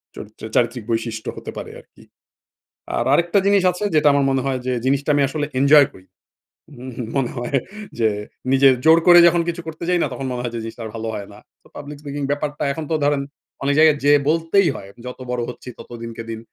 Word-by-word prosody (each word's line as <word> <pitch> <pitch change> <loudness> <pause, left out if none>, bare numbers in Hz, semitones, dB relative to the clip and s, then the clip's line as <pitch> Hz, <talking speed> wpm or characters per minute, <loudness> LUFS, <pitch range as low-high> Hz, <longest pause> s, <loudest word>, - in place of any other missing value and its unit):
চরিত্র 110 +1 -11
চারিত্রিক 120 -1 +1
বৈশিষ্ট্য 115 -1 -3
হতে - - -7
পারে 440 - -7
আরকি। - - -22 0.9
আর - - 0
আরেকটা 175 +3 +3
জিনিস 200 -2 +4
আছে 180 +4 -6
যেটা 150 -1 +4
আমার 140 -1 +2
মনে 135 -1 +1
হয় 130 -1 -1
যে 130 - +1
জিনিসটা 140 +2 0
আমি 145 - +3
আসলে 150 -1 -2
এনজয় 140 0 +6
করি। 95 0 -17 0.7
উম 130 -1 -8 0.2
মনে 125 -3 0
হয় 120 +3 -1 0.4
যে 110 -1 +3 0.4
নিজে 135 +1 +5 0.2
জোর 160 +1 +7
করে 175 0 +9
যখন 170 0 +3
কিছু 170 0 -4
করতে 160 +1 -7
যাই 180 -1 +2
না? - - 0
তখন 135 - -5
মনে 125 -1 -3
হয় 120 - -3
যে - - -3
জিনিসটা 115 +1 -8
আর - - -6
ভালো 115 0 -4
হয় 100 - -6
না। 105 - -14 0.2
তো - - -20
পাবলিক 145 0 -8
স্পিকিং 145 -1 -5
ব্যাপারটা 145 0 -3
এখন 160 - -5
তো - - +2
ধরেন 145 -1 +1 0.4
অনেক 140 +1 +1
জায়গায় 155 -2 +6
যেয়ে 145 0 +5
বলতেই 165 +4 +2
হয়। 100 - -9 0.2
যত 125 - -8
বড় 125 -1 -1
হচ্ছি 125 - -9
তত - - -12
দিনকে 115 0 -7
দিন 115 - -5
140 Hz, 215 wpm, -20 LUFS, 120-155 Hz, 0.9 s, করে